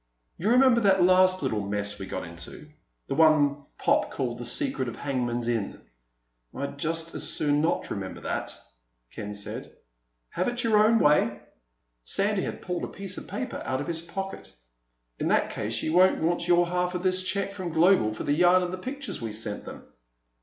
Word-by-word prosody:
"You 200 - 0
remember 250 -1 +5
that 195 -3 +4
last 185 -1 +5
little 110 -6 0
mess 100 +1 -3
we 95 - -6
got - - -4
into—the 90 - -10
one 145 -2 +4
Pop - - +2
called 120 -3 -3
The 120 - -5
Secret 130 - 0
of 120 - -5
Hangman's 120 -4 -2
Inn?" 115 -4 -2 0.8
"I'd 140 +1 -5
just 165 +2 -1
as - - -2
soon 145 -1 +1
not 160 - 0
remember 95 -2 -5
that," - - -4 0.5
Ken 105 0 -6
said. 100 - -7 0.5
"Have - - -2
it 245 +1 -1
your 220 -2 +4
own 225 +2 +5
way." 150 - +3 0.6
Sandy 200 - +1
had - - -5
pulled 180 -1 -3
a - - -2
piece 195 -1 -4
of - - -10
paper 260 -2 -4
out 130 0 -2
of - - -3
his 165 -1 -2
pocket. 195 +3 -6 0.7
"In - - -1
that - - +2
case - - -3
you 155 - -1
won't 185 +2 +5
want 170 +1 0
your 175 0 +5
half 180 +1 -1
of 180 - -3
this 185 0 +2
check 195 +1 -2
from 185 -3 -5
Global 165 - +4
for 110 - -6
the 145 - +1
yarn 180 +3 +5
and 180 0 -3
the 185 - -5
pictures 270 - -6
we 115 -2 -4
sent 105 -1 -5
them." - - -9
165 Hz, 190 wpm, -27 LUFS, 125-185 Hz, 0.8 s, remember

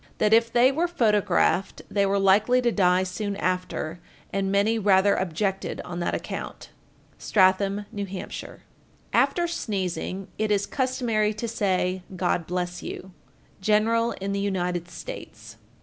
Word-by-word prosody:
that 215 0 +3
if 230 +1 +4
they 245 +3 +5
were 325 +5 0
photographed 210 - +1
they 200 -1 +1
were 200 +1 +1
likely 200 +6 +4
to 240 -1 +2
die 185 -3 +3
soon 200 +2 -3
after, 180 -3 -2 0.3
and 195 0 0
many 210 +3 +2
rather 200 -1 +4
objected 190 +2 -2
on 175 0 -5
that 175 - -1
account. - - -6 0.5
Stratham, 195 +1 +2
N.H. 200 -1 -3
1416. 185 -1 -7 0.5
After 345 -1 +3
sneezing, 195 - -3
it 215 0 +1
is 200 -1 +2
customary 235 -5 0
to 235 +2 -4
say, 190 -4 0
"God 175 -2 0
bless 180 0 -3
you." 190 - -7 0.5
_General 225 +3 +2
in 195 +1 -3
the 200 - -1
United 180 -3 -2
States. - - -9
200 Hz, 140 wpm, -25 LUFS, 185-220 Hz, 0.5 s, they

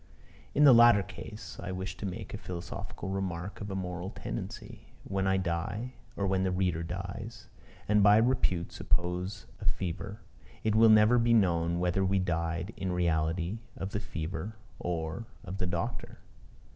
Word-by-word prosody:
In 145 - +5
the 140 -3 +10
latter 120 -3 +7
case, 105 +2 -9
I - - -4
wish 95 0 -4
to 100 - -3
make 90 - -6
a - - -3
philosophic 85 -2 -6
remark 95 0 -3
of 105 - -4
a 95 - -3
moral 90 -1 -3
tendency. - - -6 0.2
When 95 0 -1
I 95 0 +3
die, 95 +7 -2 0.2
or 100 - -1
when 95 -1 +2
the 95 - +2
reader 90 -3 +1
dies, 95 +6 -6 0.4
and 105 0 +4
by 105 +1 +7
repute 110 -7 +2
suppose 90 +3 -1
of - - +1
fever, 95 +4 -4 0.4
it 110 - +2
will 110 +1 +7
never 110 +3 +7
be 115 0 +4
known 85 -5 +3
whether 90 +2 +1
we 95 +1 +2
died 85 +1 -1
in 95 -1 -2
reality 85 +3 0 0.2
of 95 +1 -4
the 105 - -1
fever 90 +1 -4 0.2
or 85 +5 -3 0.2
of 95 +1 -6
the 90 - 0
doctor. 85 -1 -3
95 Hz, 165 wpm, -30 LUFS, 85-105 Hz, 0.4 s, the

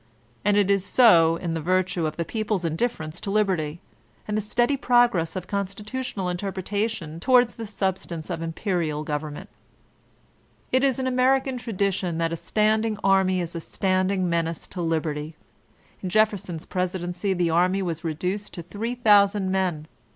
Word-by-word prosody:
And 205 0 +3
it 200 -1 +3
is 195 -2 +2
so 175 -8 +5
in 170 -1 -3
virtue 175 +1 0
of 155 - -6
the 170 - -1
people's 210 -2 -2
indifference 165 -2 -2
to - - -4
liberty, 180 -7 0 0.5
and 210 - -2
the 215 - +1
steady 240 +6 +1
progress 240 - +2
of 185 -1 -4
constitutional 200 +2 -4
interpretation 190 -1 -3
towards 245 +3 +4
the 225 -1 -7
substance 190 -4 -3
of 165 -2 -3
imperial 165 -2 -2
government 150 0 -4 1.2
It 260 +1 +3
is 270 -3 +2
an 260 - -2
American 260 +1 +2
tradition 195 -6 -1
that 165 0 0
a - - 0
standing 215 +4 +1
army 190 -1 +3
is 170 0 -5
a 165 - -3
standing 185 +1 0
menace 165 -1 -1
to 180 - -5
liberty; 155 -2 -2 0.7
in 185 - -3
Jefferson's 200 -5 +1
presidency 180 +1 -2
the 175 -2 +1
anny 185 +3 +2
was 170 -2 -3
reduced 180 +6 -3
to 170 - -6
3,000 205 -1 +2
men. 180 -5 -1
185 Hz, 150 wpm, -25 LUFS, 170-210 Hz, 1.2 s, so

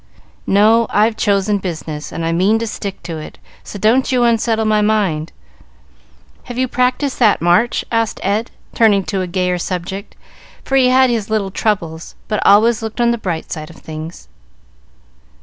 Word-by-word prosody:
"No; 220 +3 +4
I've 215 +2 +2
chosen 205 -1 +1
business, 160 -5 -6
and 165 - -4
I 165 - 0
mean 190 +6 +2
to 230 - -2
stick 200 -2 -6
to 165 -2 -5
it, 155 - -10 0.3
so - - -8
don't 225 +7 +2
you 250 -2 +2
unsettle 225 -1 +1
my 215 -1 +2
mind. 195 -7 0 1.1
Have 245 -1 -7
you 260 0 +1
practised 255 +3 0
that 220 -5 +4
March?" 175 +8 +2
asked 230 -1 0
Ed, 210 +4 0 0.2
turning 210 -4 +3
to 190 0 -2
a 185 - -3
gayer 180 0 -1
subject, 185 +3 -5 0.5
for 270 - -1
he 260 -2 +5
had 260 0 +4
his 220 -3 -2
little 210 -3 -1
troubles, 170 -6 -2
but 210 -2 -1
always 225 +3 +4
looked 220 +1 -6
on 235 0 +3
the 235 - -2
bright 175 -6 -4
side 155 -1 -5
of 165 - -13
things. 160 +2 -9
210 Hz, 170 wpm, -17 LUFS, 180-230 Hz, 1.1 s, he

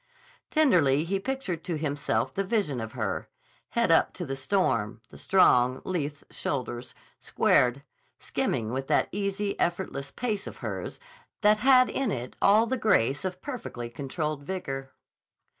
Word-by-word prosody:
Tenderly 170 - +4
he 195 +4 -1
pictured 195 -8 -3
to 170 -3 -2
himself 145 -1 -1
the 195 - 0
vision 185 - 0
of 110 -1 -6
her; 110 -6 -3 0.4
head 235 -7 +1
up 165 - +4
to 180 - -5
the 135 -2 -3
storm, 130 - 0
the - - -12
strong, 130 -9 +4
lithe 150 -5 -3
shoulders 125 -3 -4 0.2
squared, 125 +3 +2 0.4
skimming 110 0 -1
with 135 +1 -3
that - - +2
easy, 200 0 -2
effortless 170 -6 -1
pace 215 -5 -3
of - - -8
hers - - -5 0.4
that 210 0 +5
had 255 +1 +6
in 270 -5 -1
it 125 0 -5
all 210 +3 +6
the 260 +3 -1
grace 145 - +2
of 185 -1 -4
perfectly 220 - -6
controlled 150 +3 -3
vigor. 135 -5 -5
165 Hz, 145 wpm, -27 LUFS, 135-205 Hz, 0.4 s, had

